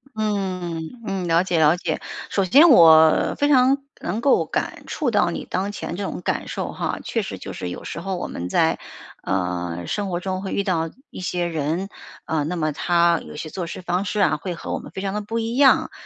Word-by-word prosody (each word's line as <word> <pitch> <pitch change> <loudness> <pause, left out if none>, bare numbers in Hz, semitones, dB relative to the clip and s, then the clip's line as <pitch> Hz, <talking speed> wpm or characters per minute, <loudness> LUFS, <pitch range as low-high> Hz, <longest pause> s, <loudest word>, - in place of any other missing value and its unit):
嗯， 185 -6 -2 0.2
嗯， 195 -3 -2
了 165 +2 +3
解 175 -3 0
了 155 +3 +5
解。 160 -3 -3 0.3
首 195 - +1
先 285 - +7
我， 160 - +7
非 290 - +2
常 270 -1 +5 0.2
能 215 +6 -3
够 280 - +3
感 - - -3
触 285 -6 -1
到 205 -5 +3
你 - - -5
当 195 +3 -1
前 175 - -5
这 200 - -4
种 185 - -4
感 - - -2
受 - - -4
哈， - - -3
确 - - -1
实 - - -6
就 - - -8
是 90 - -5
有 90 - -7
时 - - -6
候 190 0 -3
我 - - -4
们 90 +1 -5
在， - - +2 0.4
呃， 90 -2 -2
生 205 -2 -2
活 175 - -2
中 185 0 -3
会 195 - -5
遇 200 - 0
到 165 -4 0 0.2
一 - - -9
些 180 -1 -1
人， 165 +4 -2 0.4
呃， 155 -2 0
那 180 - -2
么 155 -3 0
她 170 +1 +2
有 - - -10
些 155 +1 -6
做 175 0 -5
事 185 - -7
方 180 +1 -1
式 205 +1 -2
啊， 195 - +3
会 180 -3 -5
和 - - -5
我 - - -2
们 - - -11
非 190 - -6
常 195 0 -2
地 210 - -2
不 225 +3 -4
一 230 +1 -2
样。 270 0 +5
180 Hz, 245 characters per minute, -22 LUFS, 160-200 Hz, 0.4 s, 先